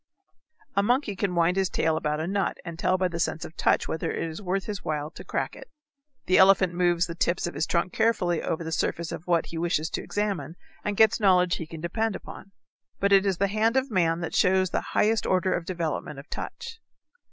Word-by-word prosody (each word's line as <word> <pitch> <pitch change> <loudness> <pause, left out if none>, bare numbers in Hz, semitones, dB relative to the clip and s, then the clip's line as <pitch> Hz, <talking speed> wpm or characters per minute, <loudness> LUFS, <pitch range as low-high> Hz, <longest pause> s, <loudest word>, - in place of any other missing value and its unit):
A 200 - +4
monkey 240 0 +1
can 185 -1 -1
wind 170 +2 +2
his 190 -2 +2
tail 160 -1 +1
about 150 -1 -1
a 160 - -2
nut 195 +2 -1
and 170 -1 -7
tell 185 +1 +2
by 185 0 +1
the 170 -1 -5
sense 165 -1 -1
of 160 - -11
touch - - +2
whether 160 - -2
it - - -3
is 160 +4 -7
worth 190 0 -1
his 205 -3 -5
while 150 0 -3
to - - -10
crack - - -3
it. - - -12 0.6
The 185 - +4
elephant 190 -2 +5
moves 175 0 +2
the 170 - -6
tips 170 +1 0
of 175 - -4
his 160 - -1
trunk 175 +1 0
carefully 200 -7 +1
over 165 +1 -2
the 160 - -5
surface 165 +1 -1
of 170 - -7
what 170 -2 +2
he 165 - -6
wishes 165 -2 0
to - - -2
examine 205 -5 -2 0.3
and 205 -1 -2
gets 220 0 +5
knowledge 180 -4 +4
he 165 - -6
can 160 -1 -9
depend 220 +5 -1
upon. 195 - -10 0.5
But 200 0 +1
it 195 0 +5
is 190 -3 +1
the 200 - +2
hand 220 +4 +2
of 265 -1 0
man 170 -3 +1
that 170 - -4
shows 185 0 +3
the - - 0 0.2
highest 220 +1 +2
order 185 0 +2
of 175 - -2
development 165 -4 -3
of 140 - -10
touch. 455 - -6
180 Hz, 230 wpm, -26 LUFS, 165-200 Hz, 0.6 s, elephant